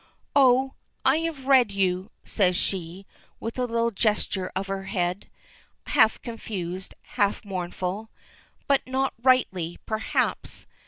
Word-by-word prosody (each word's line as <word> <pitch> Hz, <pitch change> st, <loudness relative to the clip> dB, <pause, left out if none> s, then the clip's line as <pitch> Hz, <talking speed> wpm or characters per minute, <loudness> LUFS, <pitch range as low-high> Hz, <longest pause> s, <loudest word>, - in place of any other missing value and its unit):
"Oh, 265 Hz, -1 st, +5 dB, 0.3 s
I 265 Hz, +3 st, +5 dB
have 320 Hz, -5 st, -3 dB
read 260 Hz, -5 st, +5 dB
you," 190 Hz, 0 st, 0 dB
says 185 Hz, -4 st, +2 dB
she, 185 Hz, +1 st, -3 dB, 0.3 s
with 230 Hz, +3 st, -5 dB
a 250 Hz, -, +2 dB
little 230 Hz, -1 st, +1 dB
gesture 205 Hz, -3 st, 0 dB
of 190 Hz, +1 st, -1 dB
her 195 Hz, -1 st, -4 dB
head, 180 Hz, -1 st, -2 dB, 0.6 s
half 220 Hz, -2 st, +4 dB
confused, 190 Hz, -6 st, -5 dB
half 205 Hz, +1 st, 0 dB
mournful. 185 Hz, +2 st, -4 dB, 0.6 s
"But 275 Hz, -1 st, +4 dB
not 265 Hz, +1 st, 0 dB
rightly, 190 Hz, -10 st, +2 dB
perhaps. 220 Hz, 0 st, -1 dB
210 Hz, 120 wpm, -26 LUFS, 185-250 Hz, 0.6 s, Oh